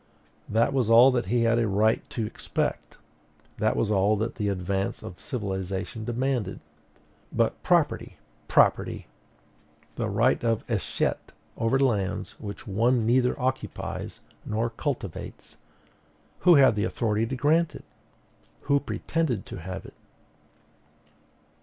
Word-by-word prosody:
That 115 +4 +2
was 125 -5 +1
all 120 +4 +8
that 120 -6 -1
he 120 +3 +2
had 115 0 +3
a 115 - +1
right 105 +3 +2
to 115 - -3
expect; 105 - -3 0.6
that - - +2
was 110 - 0
all 100 +1 +3
that 110 +2 -2
the 105 -2 -2
advance 95 +1 -2
of 90 - -9
civilization 95 -3 -4
demanded. 120 -4 -1 0.7
But - - 0
property, - - +1 0.3
property! - - +2 0.9
the 115 -2 -1
right 115 +7 +2
of 115 -2 +1
escheat - - -2 0.2
over 115 +4 +1
lands 110 -9 0
which 100 -1 -7
one 115 +3 +2
neither 125 +3 +2
occupies 130 +1 -3 0.2
nor 115 +2 -1
cultivates, 115 - -5 0.8
who 175 -1 +6
had 130 -7 +5
authority 110 +1 0
to 130 - -3
grant 155 +5 +2
it? - - -11 0.8
who 140 0 +2
pretended 140 - -2
to - - -8
have 90 +2 -7
it? - - -12
115 Hz, 125 wpm, -26 LUFS, 100-125 Hz, 0.9 s, all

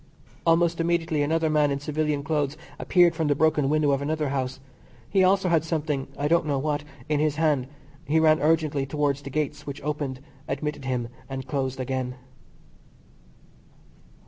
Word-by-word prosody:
Almost 165 0 +3
immediately 165 -2 +1
another 160 +2 +1
man 150 -1 +3
in 140 0 -1
civilian 150 0 -1
clothes 150 -1 -1 0.2
appeared 175 -2 +4
from 160 -2 -1
the 145 - +2
broken 150 -1 +2
window 150 -1 +3
of 140 0 +1
another 150 0 -1
house. 130 -1 -2 0.5
He 190 - +3
also 190 0 +3
had 165 -3 +3
something 150 -4 -2
(I 145 - 0
don't 165 +1 +2
know 140 -2 +1
what) 145 +1 -1 0.2
in 150 -1 +1
his 150 -1 +1
hand. 150 -5 +1 0.4
He 160 +2 +3
ran 155 -1 +4
urgently 150 -3 +1
towards 145 -1 0
the 140 - -7
gates, 150 0 -3
which 140 - -5
opened, 145 -3 -3 0.3
admitted 140 0 -3
him, 125 -3 -2 0.2
and 135 -1 -5
closed 130 -2 -2
again. 130 -1 -2
150 Hz, 165 wpm, -26 LUFS, 140-160 Hz, 0.5 s, appeared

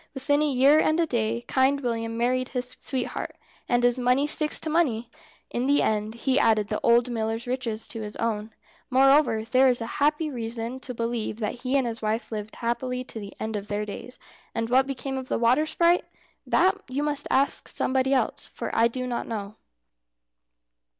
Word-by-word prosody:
Within 285 +2 +1
a 300 - +2
year 275 +4 +5
and 315 +1 +2
a 335 - +3
day 235 -4 -1
Kind 270 +2 +2
William 230 -2 -2
married 255 +2 0
his 250 -1 -4
sweetheart, 260 -3 -3 0.3
and 245 0 +3
as 245 +1 +3
money 250 +3 +3
sticks 300 0 +3
to - - -5
money, 255 -8 +1 0.4
in 245 +2 -1
the 285 +1 +4
end 215 +1 -1
he 265 +3 +1
added 215 -5 +3
the - - -1
old 235 +1 +4
miller's 225 0 -2
riches 240 -3 -3
to 225 - -5
his 210 -1 -6
own. 220 -1 -2 0.4
Moreover 270 -3 +4
there 255 +4 +4
is 250 -1 +2 0.2
every 300 +1 +2
reason 235 0 -4
to 255 -1 -7
believe 230 -2 -2
that 225 +2 -4
he 260 +2 +1
and 265 - +1
his 230 -1 -4
wife 220 +2 -2
lived 215 0 -5
happily 250 +2 -2
to 235 - -7
the 200 -1 -8
end 220 0 -3
of 205 0 -4
their 210 0 -2
days. 230 +4 -8 0.4
And 230 +1 -2
what 260 +1 +4
became 270 0 -3
of 260 - -8
the - - 0
water 250 +7 +3
sprite? 345 +2 +3 0.4
That 385 +2 +3
you 275 +3 -1
must 295 -1 -2
ask 275 +1 +1
somebody 265 0 0
else, 270 - 0
for - - -6
I 230 +1 +5
do 255 +2 -4
not 245 -1 -3
know. 205 -2 -5
245 Hz, 190 wpm, -26 LUFS, 225-270 Hz, 0.4 s, year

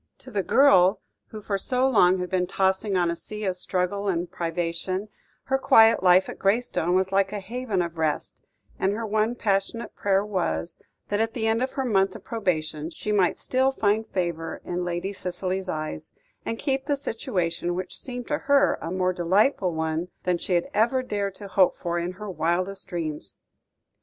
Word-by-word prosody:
To 260 - -12
the 205 -3 0
girl 195 -6 +5 0.3
who 215 -1 -9
for 200 -1 -1
so 255 +4 +1
long 190 -7 +5
had 180 -1 -4
been 180 -1 +1
tossing 190 +1 +1
on 175 -1 +2
a - - -2
sea 210 +5 -7
of 190 -2 0
struggle 185 +2 -1
and 175 -2 -1
privation, 175 +4 -2 0.3
her 270 0 0
quiet 225 -4 +6
life 185 0 +5
at - - -8
Graystone 195 -4 +1
was 190 0 +1
like 195 0 +2
a 210 - -3
haven 220 -2 -2
of 170 -1 -6
rest; 155 -2 -2 0.4
and 195 +1 +1
her 225 +2 -3
one 215 +2 +1
passionate 210 +1 -1
prayer 195 0 +1
was, 85 - -2 0.3
that 205 - 0
at 225 0 0
the 225 -3 -1
end 225 +1 +2
of 260 - -1
her 270 - -2
month 195 -5 +2
of - - -10
probation, 160 -8 -2
she 210 +5 -4
might 190 -4 +2
still 260 +1 +1
find 220 -3 +1
favour 170 -4 -3
in 180 0 -2
Lady 175 +3 -3
Cicely's 185 0 -3
eyes, 155 - -5 0.3
and 230 - -2
keep 270 +1 -1
the 285 - +1
situation 175 -10 -2
which 185 0 -5
seemed 245 -2 -4
to 295 0 0
her 280 0 +3
a 165 - -4
more 185 0 0
delightful 185 +3 +2
one 160 +1 -2 0.2
than 180 -1 +1
she 185 - -2
had 175 - +1
ever 250 +4 +2
dared 200 -5 -2
to 205 - -9
hope 190 -1 +3
for 175 0 -2
in 175 +2 -3
her 210 +3 -8
wildest 185 +2 -1
dreams. 155 - -4
190 Hz, 190 wpm, -25 LUFS, 175-220 Hz, 0.4 s, quiet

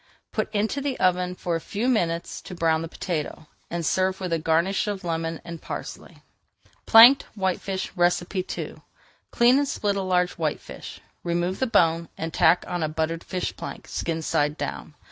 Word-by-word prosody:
Put 215 0 -2
into 220 +6 0
the 275 -2 -2
oven 180 0 +2
for 175 -2 -2
a 165 - -2
few 210 +8 -2
minutes 170 -9 0
to 180 - -9
brown 160 -2 +2
the 165 - -4
potato, 160 -2 -4 0.2
and 170 -1 -3
serve 190 +3 +1
with 180 -3 -2
a 165 - +1
garnish 165 +6 +1
of 200 -2 -3
lemon 165 -1 -2
and 170 -1 -7
parsley. - - -8 0.6
PLANKED 245 +5 +9
WHITEFISH 190 -1 -2
II 175 +1 -1 0.5
Clean 245 +3 +5
and 285 - 0
split 205 -6 -1
a 200 - -1
large 180 -1 +1
whitefish, 155 -2 -4 0.2
remove 175 +2 -1
the 260 - +1
bone, 170 -6 +2
and 160 0 -4
tack 165 +2 +4
on 175 -1 -3
a 155 - 0
buttered 160 +1 -2
fish 185 -1 -3
plank, - - -8
skin 165 -1 -3
side 150 0 +1
down. 150 - -5
180 Hz, 170 wpm, -25 LUFS, 165-195 Hz, 0.6 s, PLANKED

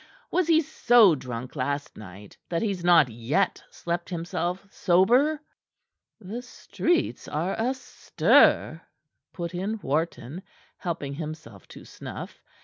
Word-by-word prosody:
Was 365 -3 +1
he 325 -1 +5
so 240 - +5
drunk 125 -2 -6
last 145 +2 -3
night 100 0 -12
that 170 +2 -1
he's 195 -5 -2
not 170 -5 +6
yet 120 - -1
slept 170 0 -4
himself 175 +2 -3
sober?" 245 - +3 0.8
"The 220 +4 -6
streets 330 +6 -2
are 165 +6 -2
astir," 255 +4 +2 0.5
put 170 0 -5
in 200 +5 -3
Wharton, 155 +1 -2 0.4
helping 160 -6 -4
himself 150 - -8
to - - -13
snuff. - - -9
175 Hz, 115 wpm, -26 LUFS, 145-215 Hz, 0.8 s, not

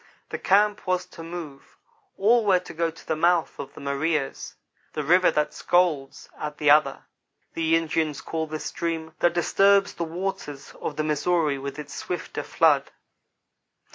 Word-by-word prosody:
The - - -4
camp 205 +1 +2
was 180 0 0
to 165 - -12
move. 165 -4 -9 0.4
All 230 +4 +4
were 195 -3 +4
to 180 - -8
go 165 +1 0
to 165 - -14
the 160 - 0
mouth 170 +1 +1
of 140 - -7
the - - -10
Maria's 140 +1 -2 0.4
"The 150 - -2
River 180 +5 +5
That 150 0 0
Scolds 165 -7 0
at 150 0 -5
the 150 -1 +4
Other" 150 -2 +3 0.5
the 165 0 +2
Indians 160 -2 0
call 160 -1 -3
this 155 0 -5
stream, 165 -1 -3
that 175 - +3
disturbs 195 +3 +3
the 170 - -3
waters 165 -5 -5
of 150 - -3
the 155 - -1
Missouri 155 -1 +1
with 140 +2 -6
its 145 -2 -8
swifter 180 - -4
flood. - - +2
160 Hz, 165 wpm, -25 LUFS, 150-175 Hz, 0.5 s, River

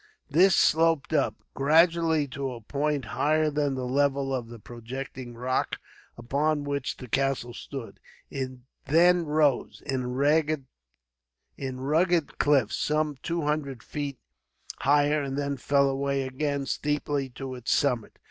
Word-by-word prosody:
This 180 +5 +5
sloped 160 -1 +3
up, 130 -8 +2 0.2
gradually, 160 +1 +3
to 135 -1 -4
a 120 - -9
point 145 +3 -1
higher 155 +1 +2
than 145 -2 0
the 130 -1 -3
level 135 +1 +1
of 125 -3 -2
the 120 0 -10
projecting 120 +2 -8
rock 125 +2 -1 0.4
upon 145 +5 0
which 140 -2 -3
the 125 - -9
castle 135 -1 0
stood. 130 -1 -8 0.3
It 130 -1 -3 0.4
then 170 +2 +4
rose, 150 -3 +1
in 130 -3 -2
rugged 150 +2 +2 1.8
cliffs, 135 -7 +3
some 150 -1 0
two 170 -1 -2
hundred 145 -4 -2
feet 145 -2 -4 0.6
higher; 145 +2 +3
and 135 -1 -3
then 140 0 -1
fell 140 +2 +2
away 135 0 0
again, 140 +1 -2
steeply, 145 -1 -1
to 135 -1 -6
its 125 -2 -4
summit. 125 -6 +1
140 Hz, 130 wpm, -27 LUFS, 130-150 Hz, 1.8 s, This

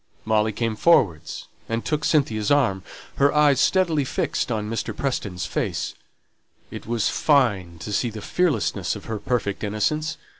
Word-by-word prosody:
Molly 110 0 +2
came 115 +1 -2
forward 105 - +4 0.5
and 115 0 -2
took 150 -1 -1
Cynthia's 110 -9 +1
arm, 120 -10 +2 0.4
her 140 +1 +4
eyes 150 -3 +4
steadily 170 -6 +2
fixed 130 - -2
on 105 -2 -2
Mr. 115 +1 -3
Preston's 105 -9 -2
face. - - -2 0.8
It - - -8
was 115 -2 +1
fine 100 - +2
to 105 - -5
see 120 +3 +1
the 110 -1 -7
fearlessness 175 - 0
of - - -9
her 110 -1 -4
perfect 105 -4 -2
innocence. 110 +10 -1
115 Hz, 150 wpm, -23 LUFS, 105-145 Hz, 0.8 s, forward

